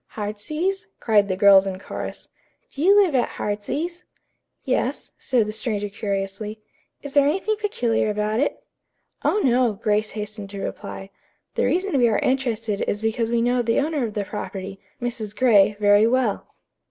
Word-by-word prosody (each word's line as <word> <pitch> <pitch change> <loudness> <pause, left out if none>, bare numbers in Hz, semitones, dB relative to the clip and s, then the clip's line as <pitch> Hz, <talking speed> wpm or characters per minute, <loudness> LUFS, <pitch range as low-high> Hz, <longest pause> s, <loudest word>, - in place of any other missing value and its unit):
"'Heartsease'?" 305 - -3
cried 210 -3 +3
the 185 - -1
girls 195 -1 +7
in 190 -1 -3
chorus. 190 - -7 0.4
"Do 275 - -7
you 395 +5 +6
live 375 -7 +3
at 250 -2 0
'Heartsease'?" 295 +13 -3 0.6
"Yes," - - -1
said 245 -5 +1
the 215 - -4
stranger 215 -2 -2
curiously. 200 +1 -4 0.4
"Is 285 -1 -7
there 285 -1 +5
anything 390 +7 0
peculiar 240 - 0
about 210 +1 -1
it?" 290 - -1 0.6
"Oh, 420 - +2
no," 245 -2 +3
Grace 210 +1 0
hastened 210 -1 -6
to 200 0 -7
reply. 195 0 -6 0.4
"The - - +1
reason 365 -5 +1
we 240 -1 +5
are 215 - +2
interested 230 -5 -1
is 205 +2 -2
because 225 +1 0
we 235 0 +1
know 245 +1 +2
the 230 -1 +1
owner 295 -1 0
of 220 -3 -4
the 205 -1 -1
property, 195 -2 -6 0.2
Mrs. 230 -4 -4
Gray, 210 -4 +4
very 205 +1 +5
well." 245 -3 0
220 Hz, 165 wpm, -23 LUFS, 205-260 Hz, 0.6 s, girls